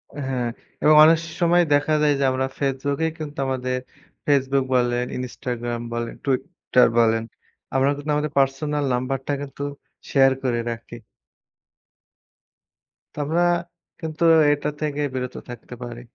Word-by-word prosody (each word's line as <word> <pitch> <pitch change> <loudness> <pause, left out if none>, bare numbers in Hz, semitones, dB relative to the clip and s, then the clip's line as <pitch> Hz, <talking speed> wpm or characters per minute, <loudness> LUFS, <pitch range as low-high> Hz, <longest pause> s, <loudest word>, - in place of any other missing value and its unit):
হ্যাঁ। 130 -4 -2 0.4
এবং 155 0 +6
অনেক 160 +1 +7 0.2
সময় 175 +1 +5
দেখা 145 +2 +2
যায় 150 -1 +4
যে, - - +1
আমরা 130 0 0
ফেসবুক 140 0 -1
এ - - +2
কিন্তু 150 -1 -7
আমাদের, 130 -1 -1 0.5
ফেসবুক 135 -1 +2
বলেন, 120 0 +1
ইনস্টাগ্রাম 120 -1 -4
বলেন, 120 0 -3
টুইটার 130 -1 +2
বলেন। 115 -1 +3 0.5
আমরা 135 +1 +3
কিন্তু 145 +1 -3
আমাদের 150 0 -1
পার্সোনাল 145 +2 0
নাম্বারটা 135 +3 -2
কিন্তু 140 0 -8 0.5
শেয়ার 135 -1 +5
করে 120 -2 0
রাখি। 115 +1 -8 2.2
তো, - - -24
আমরা 165 +4 +1 0.6
কিন্তু 160 -1 -4 0.3
এটা 145 0 0
থেকে 150 -1 -1
বিরত 125 0 -4
থাকতে 120 0 -9
পারি। 120 0 -7
135 Hz, 130 wpm, -23 LUFS, 125-145 Hz, 2.2 s, অনেক